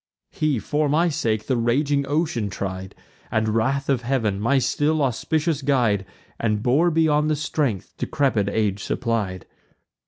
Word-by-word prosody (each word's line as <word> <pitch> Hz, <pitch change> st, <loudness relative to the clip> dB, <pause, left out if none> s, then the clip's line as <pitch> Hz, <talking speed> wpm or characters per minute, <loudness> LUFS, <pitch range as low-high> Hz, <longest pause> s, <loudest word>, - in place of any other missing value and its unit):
He, 155 Hz, -4 st, 0 dB
for 145 Hz, +8 st, 0 dB
my 165 Hz, +4 st, +3 dB
sake, 110 Hz, -8 st, -1 dB
the 130 Hz, -, 0 dB
raging 140 Hz, +4 st, +1 dB
ocean 145 Hz, -8 st, 0 dB
tried, 95 Hz, -1 st, -5 dB, 0.3 s
And 110 Hz, 0 st, 0 dB
wrath 130 Hz, +6 st, 0 dB
of 135 Hz, -3 st, +1 dB
Heav'n, 115 Hz, -6 st, 0 dB
my 120 Hz, +7 st, +2 dB
still 145 Hz, +4 st, +1 dB
auspicious 150 Hz, +4 st, 0 dB
guide, 120 Hz, -9 st, +1 dB, 0.3 s
And 105 Hz, -2 st, 0 dB
bore 145 Hz, +8 st, +3 dB
beyond 155 Hz, -2 st, +2 dB
the 155 Hz, -, +2 dB
strength 145 Hz, -, -2 dB
decrepid 120 Hz, -8 st, +1 dB
age 100 Hz, -2 st, 0 dB
supplied. 110 Hz, -7 st, -2 dB
130 Hz, 145 wpm, -23 LUFS, 110-145 Hz, 0.3 s, my